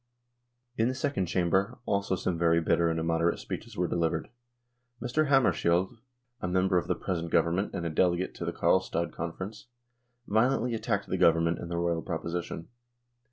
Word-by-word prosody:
In 115 - +3
the 130 - -1
Second 130 -9 -1
Chamber 95 +3 +1
also 100 -2 0
some 90 -1 -1
very 85 0 +3
bitter 85 +1 +2
and 80 0 -1
immoderate 85 +1 +1
speeches - - -7
were 90 0 +1
delivered. 85 -2 -1 0.7
Mr. 125 +6 0
Hammar 135 -3 +5
skiold, 90 +6 0 0.4
a - - -1
member 90 0 +2
of - - -7
the - - +1
present 85 -3 -3
Government 85 +5 +2
and 85 - -3
a - - 0
delegate 90 +2 +1
to - - -6
the - - -1
Karlstad 90 -2 +1
Conference, 95 +7 -6 0.6
violently 120 +2 +2
attacked 110 -3 -1
the 95 - -1
Government 85 -1 +4
and 85 - -6
the 85 - -2
Royal 85 -1 0
proposition. 85 -1 -4
90 Hz, 165 wpm, -29 LUFS, 85-100 Hz, 0.7 s, Hammar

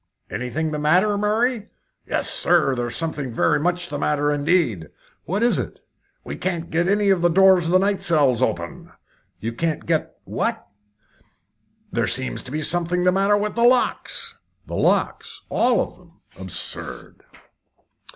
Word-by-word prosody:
"Anything 155 +6 -3
the 150 - -3
matter, 180 +8 +3
Murray?" 215 +2 0 0.4
"Yes, - - -1
sir; 170 -6 +3
there's 120 -2 -3
something 150 -6 -2
very 115 - +2
much 175 +2 -1
the 145 0 -4
matter, 145 0 +1
indeed." 145 - +1 0.4
"What 195 +6 -1
is 240 - +3
it?" - - -5 0.4
"We - - -7
can't 175 -3 -3
get 170 +2 +1
any 200 0 +2
of 185 -3 +2
the 175 - +4
doors 190 0 +5
of - - -1
the 185 - +6
night 195 +1 0
cells 140 -7 +2
open." 85 -8 -3 0.5
"You 115 +2 -4
can't 160 +4 -2
get 160 -2 -1
what?" - - -2 1.3
"There - - 0
seems 130 +2 0
to 130 - -6
be 155 +2 -2
something 175 +1 +1
the 180 - +4
matter 195 +2 +2
with 210 +1 -2
the 235 - -2
locks." 255 - +1 0.3
"The - - -6
locks? - - 0
All 245 0 +2
of - - -3
them? 170 -2 -23 0.2
Absurd!" 95 -2 -3
170 Hz, 160 wpm, -22 LUFS, 145-195 Hz, 1.3 s, the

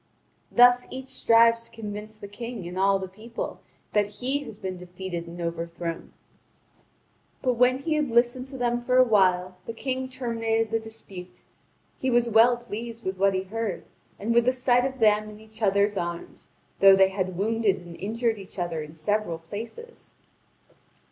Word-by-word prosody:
Thus 245 0 +6
each 265 0 -8
strives 230 0 +4
to - - -20
convince 215 -1 -7
the 205 -1 -9
King 230 -2 -7
and 175 - -7
all 195 +1 +3
the 190 0 -5
people 220 +5 -7 0.3
that 205 -1 +1
he 265 +3 -1
has 210 - -10
been 190 -2 -5
defeated 180 -1 -6
and 170 +1 -9
overthrown. 170 0 -4 1.3
But 255 -2 +2
when 250 +2 +3
he 310 +4 -2
had 300 -3 0
listened 240 +2 +2
to 265 0 -8
them 240 -1 0
for 250 +1 +1
a 255 - +8
while, 185 -5 +2
the 230 - -4
King 260 +2 -3
terminated 225 -3 -1
the 225 - +1
dispute. 195 -5 -11 0.6
He 260 - 0
was 240 -1 +2
well 235 +3 +6
pleased 235 0 -7
with 190 0 -3
what 195 0 +3
he 185 - -1
heard 220 0 -4 0.3
and 220 +4 -1
with 235 0 +4
the 255 - +3
sight 250 -1 +2
of 265 0 -3
them 215 -2 +3
in 210 0 -12
each 220 +1 -15
other's 200 0 +2
arms, 170 -1 -5 0.3
though 195 0 +8
they 190 0 +5
had 185 -2 -3
wounded 220 0 +1
and 175 -2 -11
injured 225 +1 -1
each 195 0 -12
other 175 -3 -2
in 150 +1 -9
several 190 +1 -1
places. 230 - -9
220 Hz, 175 wpm, -26 LUFS, 190-240 Hz, 1.3 s, a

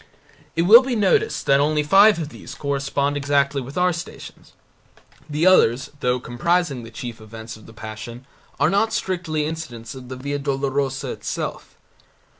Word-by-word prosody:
It 165 - +2
will 220 +7 +9
be 260 -2 -2
noticed 420 - +1
that 140 0 +4
only 150 +1 +2
five 195 +6 +6
of 160 -3 -4
these - - -10
correspond 140 0 -1
exactly 140 -1 +1
with 135 +5 -9
our 180 0 +3
Stations. 170 +1 -9 0.8
The 150 +3 0
others, 130 -9 +4
though 125 -1 0
comprising 145 +3 0
the 115 - -10
chief 115 0 -8
events 110 +1 -9
of 110 - -16
the - - -12
Passion, 110 +3 -9 0.3
are 145 +3 +3
not 220 +3 +1
strictly 170 -7 -2
incidents 135 -7 -6
of 130 -2 -11
the 130 - -5
Via 140 +2 -4
Dolorosa 135 -1 -2
itself. - - -5
140 Hz, 160 wpm, -22 LUFS, 125-170 Hz, 0.8 s, will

